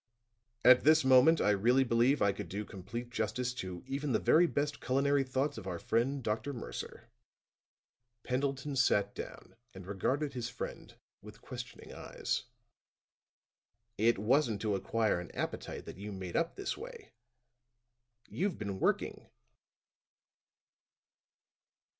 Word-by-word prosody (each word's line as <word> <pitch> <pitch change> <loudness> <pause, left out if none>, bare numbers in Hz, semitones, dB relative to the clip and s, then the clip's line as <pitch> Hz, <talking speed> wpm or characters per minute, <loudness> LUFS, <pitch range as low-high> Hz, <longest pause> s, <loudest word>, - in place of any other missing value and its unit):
At 125 0 +8
this 155 -1 +5
moment 130 +5 +6
I 105 - +4
really 120 +7 +4
believe 120 +2 +3
I 100 - +4
could 100 -3 -7
do 105 +4 -4
complete 115 +6 -7
justice 125 +2 -1
to 95 -7 -6
even 135 +1 -2
the - - +4
very 175 +2 +5
best 145 -2 -2
culinary 140 +2 +2
thoughts 135 0 -1
of 95 - -9
our 90 -2 -3
friend, 125 +8 0
Dr. 110 +6 -2
Mercer." 120 - -7 1.1
Pendleton 135 +2 -1
sat 105 -6 +2
down - - -9 0.2
and 95 -1 -9
regarded 135 +10 -1
his 120 -2 -3
friend 125 - -7 0.3
with 105 0 -13
questioning 125 -1 -8
eyes. - - -3 1.5
"It 115 +3 +3
wasn't 115 +1 +2
to 110 -2 0
acquire 105 +1 +1
an 90 - -7
appetite - - -4
that - - -9
you 105 +1 -6
made 95 -3 -6
up 165 - 0
this 395 -1 -3
way. 470 -2 -10 1.2
You've 195 0 -2
been 100 -3 -4
working." - - -1
125 Hz, 130 wpm, -32 LUFS, 105-140 Hz, 1.5 s, At